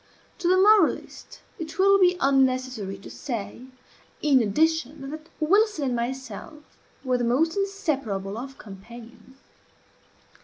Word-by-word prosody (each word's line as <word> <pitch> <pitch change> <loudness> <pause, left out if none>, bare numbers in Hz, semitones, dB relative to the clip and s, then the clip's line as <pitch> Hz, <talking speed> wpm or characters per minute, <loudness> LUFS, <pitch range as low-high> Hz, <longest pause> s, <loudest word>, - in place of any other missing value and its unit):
To 345 - -1
the 370 +1 +4
moralist 405 -2 +2 0.2
it 320 -1 -7
will 395 +1 +5
be 360 -1 +4
unnecessary 255 - +1
to 195 - -12
say, 240 -1 -6 0.6
in 280 -4 +5
addition, 285 +4 0
that 310 +1 -9
Wilson 400 +1 +2
and 250 -2 0
myself 260 +4 -6 0.3
were 255 -2 0
the - - -1
most 285 +8 +1
inseparable 280 - -2
of 265 +4 -7
companions. 235 +5 -13
270 Hz, 120 wpm, -25 LUFS, 235-325 Hz, 0.6 s, will